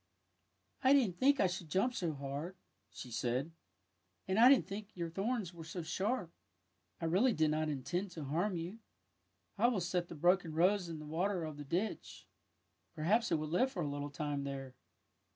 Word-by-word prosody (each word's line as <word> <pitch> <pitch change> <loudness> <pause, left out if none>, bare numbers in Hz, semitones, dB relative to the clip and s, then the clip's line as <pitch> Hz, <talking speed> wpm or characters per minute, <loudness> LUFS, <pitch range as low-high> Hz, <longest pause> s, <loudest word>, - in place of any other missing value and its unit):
" - - -36
I 265 +1 +6
didn't 225 -11 +3
think 275 +1 +4
I - - +5
should 180 -3 -3
jvmip 200 +10 +2
so 170 -8 -1
hard," 140 +6 -5 0.3
she 125 - -9
said. 125 +6 -1 0.4
'' 90 -1 -45
And 190 +3 +1
I 245 +2 +9
didn't 265 -7 +4
know 200 +2 -3
your 170 -2 -3
thorns 195 0 -2
were 165 -1 -9
so 165 +2 -5
sharp. 190 +2 -1 0.7
I 165 - -3
really 200 +10 +3
did 155 -3 +2
not 155 0 0
intend 150 +8 -2
to 160 - -6
harm 175 +8 0
you. 175 +6 -5 0.4
'' 90 0 -44
I 235 - +5
will 240 -5 +1
set 175 0 -1
the 170 - -8
broken 175 0 +2
rose 180 +2 +3
in 165 - -5
the 150 - -8
water 175 +4 -1
of 155 -2 -5
the 145 - -6
ditch. 180 +9 -3 0.7
Perhaps 205 +9 +2
it - - +4
will 155 -1 -2
live 250 +11 +2
for 180 -8 -3
a - - -1
little 145 0 -4
time 145 -1 -3
there! 135 -2 -5
170 Hz, 200 wpm, -35 LUFS, 150-195 Hz, 0.7 s, I